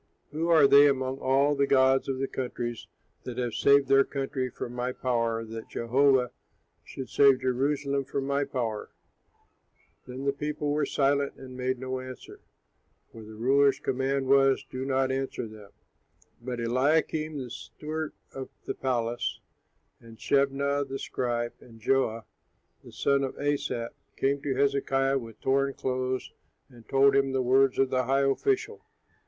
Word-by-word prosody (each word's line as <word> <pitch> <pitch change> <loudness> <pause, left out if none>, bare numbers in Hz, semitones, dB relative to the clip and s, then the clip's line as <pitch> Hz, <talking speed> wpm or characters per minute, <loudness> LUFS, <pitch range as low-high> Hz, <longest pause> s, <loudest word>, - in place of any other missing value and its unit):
Who 160 +3 -2
are 160 -4 +6
they 140 +1 +7
among 130 0 -1
all 135 +2 +2
the 140 -1 +1
gods 135 0 +3
of 135 - -1
the 135 +1 -1
countries, 120 -3 -5 0.3
that 125 -1 -7
have 120 -2 -2
saved 140 -1 +4
their 135 0 +5
country 135 -2 -3
from 120 0 -7
my 125 +1 -2
power, 115 -3 -1
that 115 0 -8
Jehovah 125 +1 +2 0.5
should 130 - -8
save 140 -2 +4
Jerusalem 140 +2 0
from 135 0 -3
my 140 +1 0
power?'" 120 -6 -3 1.2
Then 130 +2 -7
the 140 - +1
people 150 +1 -3
were 145 -1 0
silent 140 0 +1
and 130 -1 -11
made 130 0 -1
no 130 +1 -4
answer; 130 0 -10 0.7
for 115 - -11
the 110 0 -11
ruler's 135 +5 +3
command 135 +1 -1
was, 135 0 +4
"Do 130 +1 -4
not 135 -1 +1
answer 135 -1 -3
him." 110 -3 -10 0.7
But 125 0 -5
Eliakim, 150 +5 +1
the 125 -3 -6
steward 155 +4 -6 0.2
of 135 -1 -6 0.2
the - - -2
palace, 120 -2 -2 0.6
and 115 -1 -14
Shebnah, 140 +2 +1
the 135 0 -4
scribe, 120 -3 -2
and 115 -2 -16
Joah, 115 -2 0 0.6
the - - -13
son 140 0 +1
of 135 - -4
Asaph, 140 -5 -2 0.3
came 140 +1 0
to 135 -2 -2
Hezekiah 135 0 +1
with 115 -3 -11
torn 135 +1 +1
clothes 130 0 -2 0.4
and 120 -4 -17
told 135 0 +4
him 135 -1 +2
the 130 -1 +1
words 130 +1 +3
of 135 -1 +2
the 130 -1 +1
high 135 +2 +2
official. 415 - -1
135 Hz, 155 wpm, -28 LUFS, 125-140 Hz, 1.2 s, they